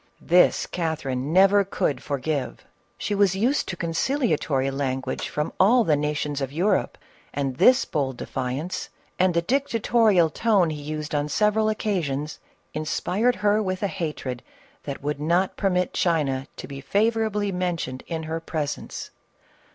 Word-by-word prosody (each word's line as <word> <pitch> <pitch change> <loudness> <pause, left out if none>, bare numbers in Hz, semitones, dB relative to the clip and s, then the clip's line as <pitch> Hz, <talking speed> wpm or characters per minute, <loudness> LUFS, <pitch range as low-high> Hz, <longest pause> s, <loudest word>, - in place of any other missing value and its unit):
This 180 +2 +4
Catherine 150 -5 -2
never 195 +3 +6
could 145 -8 -1
forgive. 140 -1 -3 0.3
She 210 - -2
was 200 -2 +3
used 245 +9 +1
to 175 - -4
conciliatory 165 - 0
language 135 -1 -2
from 150 0 -2
all 230 +6 +5
the 155 -7 +3
nations 150 -1 -2
of 135 -1 -2
Europe, 185 +6 +1 0.4
and 135 -2 -2
this 255 - +5
bold 135 -5 -2
defiance, 130 +9 -4 0.3
and 185 -1 +3
the 170 - +2
dictatorial 225 - +2
tone 200 -5 +2
he 150 -1 -5
used 150 +1 -5
on 145 0 0
several 215 +4 +2
occasions, 155 -9 -2 0.3
inspired 195 +9 0
her 210 +1 +4
with 185 -1 -2
a - - +3
hatred 150 -7 -4 0.4
that 140 -1 -6
would 145 0 -2
not 175 +5 +1
permit 180 -2 0
China 140 -6 0
to - - -7
be 135 -1 -8
favorably 210 +1 +1
mentioned 175 -8 -3
in 165 -1 -3
her 160 +1 -3
pres 155 -3 -3
ence. - - -8
165 Hz, 145 wpm, -24 LUFS, 145-200 Hz, 0.4 s, never